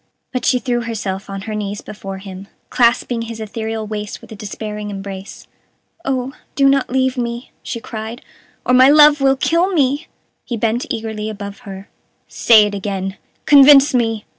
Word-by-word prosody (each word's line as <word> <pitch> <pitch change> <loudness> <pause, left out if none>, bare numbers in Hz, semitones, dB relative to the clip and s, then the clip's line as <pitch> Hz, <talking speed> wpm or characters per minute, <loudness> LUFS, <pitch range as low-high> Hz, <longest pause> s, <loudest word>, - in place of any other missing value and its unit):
But 255 - -2
she 255 - +3
threw 245 -1 -1
herself 200 -4 -4
on 195 0 -5
her 215 +2 -6
knees 205 -1 -4
before 195 -2 -8
him, 190 0 -10 0.2
clasping 240 0 +2
his 230 -1 -7
ethereal 220 0 -4
waist 210 -1 -5
with - - -16
a - - -7
despairing 210 0 -6
embrace. 195 -1 -8 0.6
"Oh, 265 0 -2 0.2
do 275 -1 +4
not 275 -1 +2
leave 260 0 0
me," 235 0 -4
she 230 - -5
cried, 225 0 -7 0.4
"or 250 - +2
my 255 +1 +7
love 295 0 +6
will 270 0 +4
kill 335 +6 +1
me!" 290 -2 +1 0.4
He 240 - -4
bent 225 +2 -1
eagerly 220 -1 -4
above 200 -1 -7
her. 195 0 -9 0.4
"Say 220 -3 +5
it 205 - -4
again 195 -1 -4 0.3
convince 280 -1 +7
me!" 225 -3 0
225 Hz, 165 wpm, -18 LUFS, 205-255 Hz, 0.6 s, my